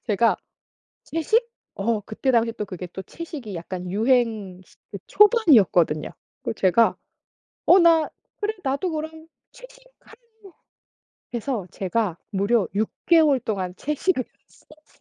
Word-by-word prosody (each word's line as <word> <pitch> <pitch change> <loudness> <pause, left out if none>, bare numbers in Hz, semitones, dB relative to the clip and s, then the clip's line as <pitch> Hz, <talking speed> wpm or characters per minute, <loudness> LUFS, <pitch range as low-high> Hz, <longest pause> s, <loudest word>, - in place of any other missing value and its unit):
제가 225 +1 +2 0.7
"채식?" 440 +9 0 0.3
어 215 +2 0
그때 215 +6 -2
당시 230 -1 +2
또 210 - -4
그게 185 -2 -7
또 190 +2 -8
채식이 275 - -8
약간 180 +1 -6
유행 220 -3 +1
스 - - -23 0.2
그 200 - -5
초반이었거든요. 255 - +4 0.3
그 - - -3
제가 205 +4 +3 0.7
"어 370 - +7
나 330 -3 +4 0.3
그래. 425 +1 0
나도 280 +6 -1
그럼 315 +1 -6 0.2
채식 - - -16 0.2
한" - - -17 1.2
그래서 240 -3 -3
제가 190 -2 -2
무려 200 +2 +1
6 215 +2 0 0.2
개월 315 -6 +5
동안 195 -6 -3
채식을 300 -1 -1 0.2
했었어요. 310 -1 -22
235 Hz, 245 characters per minute, -23 LUFS, 200-320 Hz, 1.2 s, 어